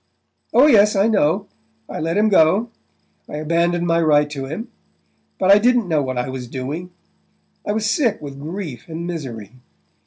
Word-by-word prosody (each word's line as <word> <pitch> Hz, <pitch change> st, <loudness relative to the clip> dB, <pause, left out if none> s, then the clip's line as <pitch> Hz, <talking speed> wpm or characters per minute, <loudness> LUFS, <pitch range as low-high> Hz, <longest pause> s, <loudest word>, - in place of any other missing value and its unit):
Oh, 260 Hz, -, +6 dB
yes, 210 Hz, -7 st, +5 dB
I 195 Hz, +2 st, +3 dB
know 195 Hz, -2 st, +1 dB, 0.4 s
I -, -, -6 dB
let 165 Hz, +4 st, -1 dB
him 215 Hz, +1 st, +3 dB
go 200 Hz, +4 st, +3 dB, 0.6 s
I -, -, -6 dB
abandoned 170 Hz, +3 st, 0 dB
my 170 Hz, 0 st, +2 dB
right 150 Hz, -2 st, +3 dB
to 135 Hz, -2 st, -5 dB
him...but 190 Hz, -, -5 dB
I 200 Hz, -, +7 dB
didn't 240 Hz, -1 st, +2 dB
know 155 Hz, -3 st, +1 dB
what 130 Hz, -2 st, -3 dB
I 125 Hz, -, -1 dB
was 130 Hz, -1 st, -6 dB
doing...I 160 Hz, +10 st, -9 dB
was 215 Hz, 0 st, -1 dB
sick 230 Hz, -3 st, +1 dB
with 140 Hz, -2 st, -9 dB
grief 160 Hz, -, -6 dB
and 165 Hz, +1 st, -6 dB
misery. 130 Hz, -, -6 dB
170 Hz, 160 wpm, -20 LUFS, 145-205 Hz, 0.6 s, I